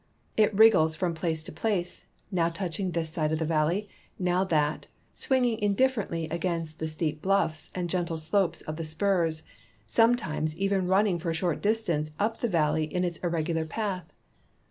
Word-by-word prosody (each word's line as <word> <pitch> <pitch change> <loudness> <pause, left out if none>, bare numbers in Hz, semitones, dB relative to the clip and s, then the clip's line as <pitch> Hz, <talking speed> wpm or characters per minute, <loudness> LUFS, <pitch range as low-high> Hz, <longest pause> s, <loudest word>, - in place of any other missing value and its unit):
It 215 0 +4
wriggles 190 -8 +6
from 175 0 -1
place 160 -1 -2
to - - -8
place, 180 +1 -2 0.2
now 170 -3 +2
touching 185 +2 -3
this 165 -2 -2
side 155 -1 0
of 160 - +1
the 160 - -1
valley, 165 +6 +1 0.3
now 180 0 +1
that, 150 -4 0 0.3
swinging 250 -4 +1
indifferently 205 -6 +1
against 165 -2 -2
the 160 - -2
steep 155 -1 -2
bluffs 190 -5 +1
and 180 -1 -1
gentle 170 -1 -1
slopes 170 +4 +1
of 155 0 -6
the 165 - -3
spurs, 160 -1 0 0.4
sometimes 155 - +2
even 195 -1 +1
running 190 -1 +3
for 170 +1 -3
a 165 - -1
short 165 0 -1
distance 200 -8 0
up 220 +2 0
the 240 - 0
valley 155 -3 +2
in 180 +4 -2
its 175 -2 -2
irregular 165 -1 -1
j)ath. 190 -1 -3
170 Hz, 165 wpm, -28 LUFS, 160-195 Hz, 0.4 s, wriggles